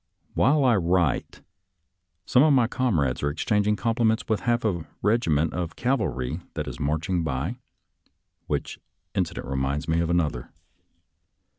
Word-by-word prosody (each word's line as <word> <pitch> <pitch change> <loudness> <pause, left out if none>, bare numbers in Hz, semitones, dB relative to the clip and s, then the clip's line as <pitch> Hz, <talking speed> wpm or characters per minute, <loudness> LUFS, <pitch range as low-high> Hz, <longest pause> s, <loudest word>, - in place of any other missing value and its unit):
While 145 +3 +3
I 120 -4 +4
write, 85 -5 0 0.8
some 125 - +4
of 150 0 +5
my 125 -3 +4
comrades 105 - 0
are 70 - +1
ex 75 - -4
changing 105 -1 +2
compliments 115 +1 +1
with 110 -2 +1
half 120 -1 0
a 85 -7 -1 0.2
regiment 85 -8 +2
of 85 -2 -3
cavalry 75 - -1 0.2
that - - -3
is - - -6
marching 80 +4 -1
by, 80 - -2 0.9
which - - -3 0.3
incident - - -2
re 65 +1 -3
minds 70 +3 -1
me 80 +1 +1
of 85 -1 0
another. 80 -8 0
90 Hz, 145 wpm, -25 LUFS, 75-115 Hz, 0.9 s, of